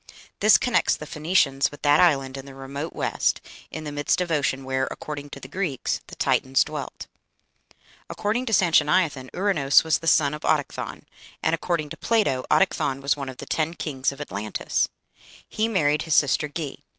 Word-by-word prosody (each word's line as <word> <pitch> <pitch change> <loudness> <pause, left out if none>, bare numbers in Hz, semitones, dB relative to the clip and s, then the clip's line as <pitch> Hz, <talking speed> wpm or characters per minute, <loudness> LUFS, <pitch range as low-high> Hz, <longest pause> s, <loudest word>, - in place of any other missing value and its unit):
This 215 +1 +7
connects 245 - +2
the 150 - -8
Phoenicians 150 -3 +1
with 145 - -14
that 145 0 +5
island 135 -6 +3
in 135 0 -8
the 135 - -11
remote 140 +4 -6
west, - - 0 0.3
in 155 - -7
the 150 - -5
midst 145 +3 0
of 180 -2 -2
ocean, 135 -3 0
where, 130 0 -1
according 145 -1 -7
to 140 - -9
the 130 - -10
Greeks, 155 -3 -2
the - - -10
Titans 130 0 +2
dwelt. - - -7 1.0
According 230 +5 -2
to - - -1
Sanchoniathon, 160 -7 +3
Ouranos 175 -8 +3
was 160 -1 +1
the 165 - -7
son 150 -3 +4
of 150 - -6
Autochthon, 150 -3 -1 0.4
and, 160 - +2
according 165 -2 -1
to - - -8
Plato, 205 - +1
Autochthon 140 -8 +2
was 140 +1 +1
one 140 -2 -5
of 130 - -9
the - - -8
ten 160 +1 -1
kings 135 -5 -2
of 140 - -12
Atlantis. 105 -7 -2 0.6
He 220 +1 -1
married 150 -9 +1
his 160 -3 0
sister 145 +1 +3
Ge. 150 -2 -5
150 Hz, 180 wpm, -24 LUFS, 135-170 Hz, 1.0 s, This